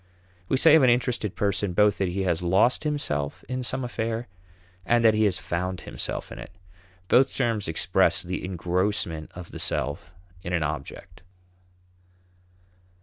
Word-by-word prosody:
We 135 - +2
say 155 +3 +6
of 160 - +7
an 130 - +5
interested 120 -4 0
person 100 -2 -1
both 105 +2 +3
that 95 - +1
he 95 +2 -2
has 85 -3 0
lost 95 - +2
himself 75 - -2
in 130 +2 -3
some 125 +2 -2
affair 115 -1 -3 0.6
and 120 +4 +2
that 110 - +6
he 110 0 +2
has 95 -3 +2
found 90 +2 -3
himself - - -5
in - - -8
it. - - -9 0.6
Both 130 +6 +3
terms 115 -5 0
express 85 +1 +2
the 90 +1 -4
engrossment 90 -2 -2
of 90 -1 -9
the - - -8
self 75 +3 -3 0.3
in 90 0 -5
an 85 -3 +1
object. 75 0 -6
100 Hz, 155 wpm, -25 LUFS, 85-120 Hz, 0.6 s, of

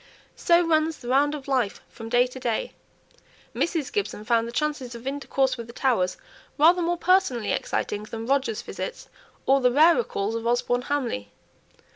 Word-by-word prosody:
So 345 0 +3
runs 315 -1 +1
the 240 - -8
round 285 +3 +3
of 285 -2 -9
life 255 -7 0
from 225 -1 -10
day 245 +1 +4
to 255 +1 -9
day. 235 -3 -2 0.8
Mrs. 330 -5 -1
Gibson 395 - -3
found 230 0 +2
the - - -6
chances 265 -2 -2
of 235 +1 -10
intercourse 270 -1 -1
with 235 -1 -7
the 235 - -11
Towers 210 -10 +1 0.4
rather 335 +4 +5
more 345 +1 0
personally 345 - +2
exciting 210 0 -2
than 225 +1 -6
Roger's 265 -4 0
visits, - - -6 0.4
or 270 0 +4
the 250 -1 +4
rarer 325 - +5
calls 205 - -3
of 230 0 -3
Osborne 245 +1 +1
Hamley. 240 - -2
260 Hz, 170 wpm, -25 LUFS, 235-300 Hz, 0.8 s, rather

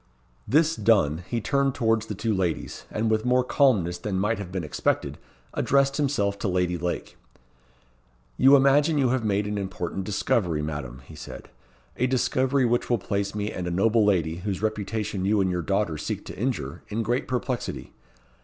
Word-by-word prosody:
This 160 +3 +3
done, 95 - +2
he 120 - -1
turned 140 +3 +1
towards 115 -1 +1
the 105 - -4
two 110 +3 -1
ladies, 90 -4 -2
and 110 +1 -1
with 110 0 +1
more 125 +1 +3
calmness 105 - +2
than 95 +1 -3
might 105 +3 0
have 95 -3 -6
been 95 -2 -3
expected, 75 - -1 0.3
addressed 140 0 +2
himself 105 -9 0
to - - -2
Lady 90 -1 0
Lake: 85 +1 -4 1.2
"You 135 - +6
imagine 145 +3 +4
you 135 -3 +3
have 130 -1 0
made 105 -1 +1
an 105 0 -2
important 95 -1 -4
discovery, 90 -5 0
Madam," 65 -4 -5
he 80 - -13
said; 75 - -10 0.5
"a 125 - +2
discovery 130 +1 +1
which 120 0 0
will 120 - +3
place 100 0 -2
me 105 0 -2
and 90 -1 -4
a - - -1
noble 110 +5 +3
lady, 85 -5 +1
whose 95 0 -3
reputation 105 -2 -2
you 105 +2 +2
and 95 -1 +2
your 90 -1 -1
daughter 95 -3 -1
seek - - -4
to - - -8
injure, 90 - -3
in 115 +2 -2
great 120 +4 -1
perplexity. 125 -1 -3
105 Hz, 180 wpm, -25 LUFS, 90-125 Hz, 1.2 s, You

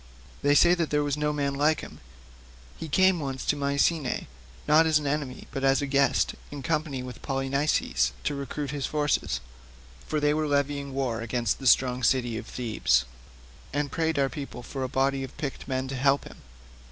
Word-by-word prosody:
They 145 +1 +3
say 175 +4 +6
that 170 -3 0
there 150 0 +1
was 145 -1 0
no 150 0 0
man 140 -1 -1
like 150 +3 +2
him. - - -10 0.8
He 160 - -7
came 185 +3 +4
once 135 -3 -4
to - - +2
Mycenae, 140 +1 0 0.4
not 160 +2 +6
as 160 -1 +4
an 150 - -3
enemy 140 -2 -2
but 135 - -4
as 135 0 +4
a 145 - -1
guest, 140 -2 +2 0.2
in 145 -2 -7
company 150 -4 -1
with 125 -1 -9
Polynices 135 - 0
to 150 - 0
recruit 140 0 -4
his 145 -2 -2
forces, 150 -1 0 0.7
for 155 - 0
they 150 0 +2
were 155 0 0
levying 140 -1 -1
war 125 -4 -1
against 115 -2 -1
the 135 - -2
strong 125 0 +4
city 120 -1 +2
of - - -6
Thebes, 105 - +1 0.7
and 145 0 -1
prayed 160 -2 0
our 135 -1 +3
people 135 -3 -7
for 135 +2 -6
a 130 - -2
body 135 +1 +1
of 130 - -9
picked 140 -3 -5
men 130 -1 -2
to 135 - -3
help 135 +2 +3
them. - - -12
140 Hz, 190 wpm, -27 LUFS, 130-150 Hz, 0.8 s, say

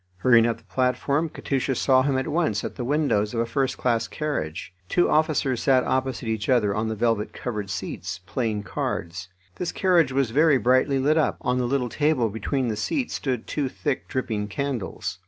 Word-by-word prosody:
Hurrying 115 +2 +5
up 115 -1 -1
the 115 - -22
platform, 130 - 0
Katusha 135 -2 -2
saw 130 +1 +4
him 135 0 +1
at 130 - -1
once 155 -10 0
at - - -4
the 125 - -4
windows 125 -6 +1
of - - 0
a 115 - +2
first 135 +3 -1
class 115 -3 0
carriage. 95 - -4 0.2
Two 175 - +3
officers 150 -5 +1
sat 130 -2 +4
opposite 130 -2 -1
each 110 -2 -2
other 110 -6 +3
on 110 +2 -1
the 110 - -2
velvet 115 -1 0
covered 105 -5 -4
seats, 95 -1 -5
playing 105 0 -2
cards. 90 0 -4 0.3
This 180 - -2
carriage 175 -8 +3
was 130 -3 +1
very 150 +2 +4
brightly 130 +3 +3
lit 150 +4 +3
up; 155 - +1
on 125 0 0
the 125 - 0
little 130 -1 0
table 145 -3 +1
between 125 +5 -1
the 110 - -1
seats 240 - -2
stood 125 -5 -2
two 140 -3 -2
thick, 140 +1 -3
dripping 110 -6 -2
candles. 125 -1 -4
125 Hz, 190 wpm, -25 LUFS, 110-140 Hz, 0.3 s, Hurrying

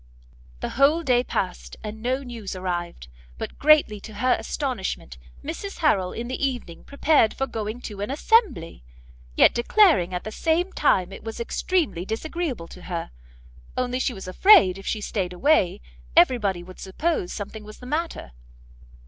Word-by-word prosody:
The - - -2
whole 295 +5 +3
day 250 -4 +3
passed, 185 -7 -4
and 215 0 -7
no 260 +3 -1
news 230 -7 -7
arrived; 175 - -4 0.3
but, - - -7
greatly 290 -8 +5
to 215 +1 -11
her 255 +5 +2
astonishment, 195 - -3 0.2
Mrs 335 +6 -6
Harrel 200 - +2
in 235 +1 -5
the 255 +3 -4
evening 245 -11 -3
prepared 280 -5 +2
for 270 - -1
going 225 -1 -5
to 205 -4 -7
an 205 - -3
assembly! 280 - +1 0.5
yet - - +6
declaring 240 - +4
at 180 -1 -3
the 215 - -6
same 335 - 0
time 190 -10 +2
it 195 - -10
was 225 0 -6
extremely 295 - -1
disagreeable 250 - -4
to 180 - -12
her, 170 -2 -4 0.7
only 255 0 -1
she 260 -2 -1
was 190 -1 -8
afraid, 190 - +6
if 195 - -11
she 215 - -1
stayed 190 -4 -2
away, 230 - +2 0.4
every 245 +7 +6
body 190 -5 -1
would 185 +1 -13
suppose 190 - -2
something 210 +1 -6
was 215 0 -11
the 250 - -12
matter. 305 - -3
230 Hz, 165 wpm, -24 LUFS, 190-285 Hz, 0.7 s, yet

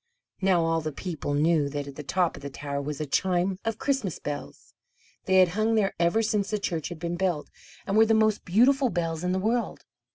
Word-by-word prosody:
Now 185 -3 +3
all 165 0 +1
the 155 0 -3
people 150 -2 -4
knew 150 -1 +2
that 145 0 -4
at 140 - -9
the 150 - -6
top 175 +4 0
of 140 - -11
the 140 - -6
tower 140 +1 -4
was 145 0 -5
a 155 - -2
chime 180 +5 0
of 225 -1 -2
Christmas 265 - -1
bells. 145 - -7 0.5
They 190 - +2
had 185 -2 +6
hung 215 +5 +1
there 205 -3 +2
ever 170 +7 +2
since 210 -2 0
the 215 - 0
church 170 -6 -3
had 175 - -7
been 170 +1 -3
built, 175 -5 -1 0.3
and 195 - -1
were 220 +1 +6
the 225 - +4
most 215 -1 +2
beautiful 255 +8 +3
bells 165 -3 -2
in 180 - 0
the 185 - +1
world. 225 +5 -1
175 Hz, 225 wpm, -27 LUFS, 155-210 Hz, 0.5 s, had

